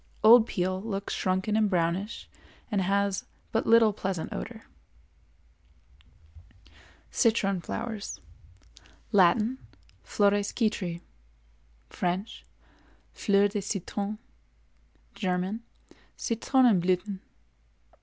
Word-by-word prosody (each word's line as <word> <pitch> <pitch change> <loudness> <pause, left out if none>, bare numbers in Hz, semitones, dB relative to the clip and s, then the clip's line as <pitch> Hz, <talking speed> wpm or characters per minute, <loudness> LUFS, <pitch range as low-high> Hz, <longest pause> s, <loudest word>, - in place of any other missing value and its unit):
Old 230 +1 +8
peel 185 +1 -1
looks 200 -2 -4
shrunken 190 +3 0
and 215 -1 +3
brownish 180 +4 -1 0.4
and 205 -2 +1
has 200 +1 0 0.3
but 225 - 0
little 225 -2 +6
pleasant 190 -4 -3
odor. - - -7 2.5
CITRON 200 -5 +2
FLOWERS. 220 +2 -5 0.9
Latin—Flores 205 0 +1
Citri; 185 -7 -1 0.9
French—Fleurs 200 +1 -2
de 205 -1 -2
citron; 200 +2 -3 1.0
German—Citronenblüthen. 200 0 -1
200 Hz, 65 wpm, -28 LUFS, 185-220 Hz, 2.5 s, Old